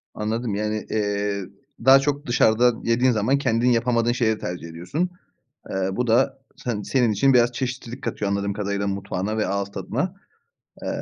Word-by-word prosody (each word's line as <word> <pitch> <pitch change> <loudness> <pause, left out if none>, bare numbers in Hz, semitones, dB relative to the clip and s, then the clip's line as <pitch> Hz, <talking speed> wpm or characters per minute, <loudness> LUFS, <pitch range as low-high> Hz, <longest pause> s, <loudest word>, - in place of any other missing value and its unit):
Anladım, 110 0 -2
yani, 105 +1 -2
eee, 105 -2 -1 0.4
daha 135 +1 +9
çok 145 +1 -1
dışarıda 120 0 +4
yediğin 125 +2 +3
zaman 115 +5 +2
kendin 125 -2 +2
yapamadığın 120 0 +2
şeyi 115 -3 +1
tercih 90 -2 -5
ediyorsun. 90 - -2 0.6
Eee, 95 0 -1
bu 125 +5 -1
da 125 +4 +2 0.2
sen 115 -5 -3
senin 120 -1 +2
için 135 +6 +3
biraz 120 0 +4
çeşitlilik 125 0 -5
katıyor 105 -3 -2
anladığım 100 0 -1
kadarıyla 100 -1 -2
mutfağına 100 +1 -2
ve 110 - +1
ağız 100 0 -2
tadına. 145 - -3 0.7
Eee, - - -4
115 Hz, 160 wpm, -23 LUFS, 100-125 Hz, 0.7 s, daha